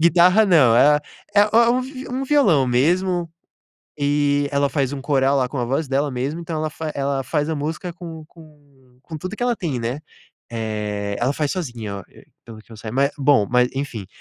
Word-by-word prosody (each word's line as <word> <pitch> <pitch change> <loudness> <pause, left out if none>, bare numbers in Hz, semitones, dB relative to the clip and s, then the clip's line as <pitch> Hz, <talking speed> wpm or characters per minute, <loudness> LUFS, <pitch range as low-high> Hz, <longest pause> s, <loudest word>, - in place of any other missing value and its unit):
guitarra 180 +6 +5
não, 140 -11 +5
é 150 +4 +6
a - - -3 0.3
é 205 - +6
é 225 +3 +4
um 255 +1 +1
vi 260 0 -8
um 260 +2 -3
violão 200 - +3
mesmo, 170 +7 +1 0.7
e 145 0 +1
ela 140 0 +1
faz 140 -2 -1
um 135 - -5
coral 140 -1 +2
lá, 125 -2 0
com 140 - -5
a 120 - -1
voz 135 +4 -1
dela 140 +2 0
mesmo, 135 +6 -3
então 165 -1 -5
ela 155 0 -1
fa 155 0 -5
ela 140 -1 -1
faz 150 +4 -1
a 160 - -1
música 155 +4 -4
com 165 -2 -9
com 145 -6 -20
com 160 0 -8
tudo 185 +7 -6
que - - -12
ela 245 -1 +1
tem, 155 -11 -3
né. 120 +5 -3 0.5
Eh, 105 -3 -3
ela 125 +3 +1
faz 150 -2 -1
sozinha 120 - -5
o - - -7
e - - -18 0.2
pelo 115 -2 -11
que - - -29
eu 110 - -10
sai 110 +1 -7
mas, 140 +2 +2
bom, 135 -7 +3
mas 125 0 +3
enfim. 130 -8 -4
145 Hz, 215 wpm, -21 LUFS, 125-170 Hz, 0.7 s, é